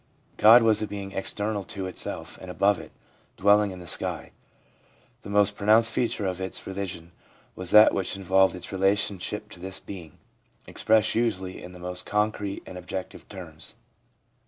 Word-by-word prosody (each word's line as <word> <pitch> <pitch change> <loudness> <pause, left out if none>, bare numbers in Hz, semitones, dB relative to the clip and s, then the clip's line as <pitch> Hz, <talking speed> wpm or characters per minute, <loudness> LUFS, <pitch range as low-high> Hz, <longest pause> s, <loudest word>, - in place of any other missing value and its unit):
God 115 +2 +8
was 110 -1 +3
a 110 - -2
being 100 -1 -6
external 105 +1 -3
to 95 -2 -6
itself 95 - -5
and 95 - -9
above 100 +2 +2
it, - - -11 0.5
dwelling 100 +1 +4
in 95 - -8
the 90 - -10
sky. - - 0 0.9
The - - -10
most 105 0 +3
pro 100 - -6
nounced 115 +2 +6
feature 115 -3 -1
of 95 0 -2
its 95 - -4
religion 95 -3 -5 0.4
was 95 -1 -3
that 105 +3 +8
which 95 0 -2
involved 95 0 +3
its 90 - -9
relationship 100 +2 -1
to - - -12
this 95 +1 -3
Being, 85 -6 -10 0.5
expressed 110 -1 +2
usually 95 -6 -1
in 90 - -10
the - - -11
most 90 0 -5
concrete 105 -1 -1
and 90 - -8
objective 90 +1 -7
terms. 80 -5 -8
95 Hz, 165 wpm, -26 LUFS, 90-105 Hz, 0.9 s, God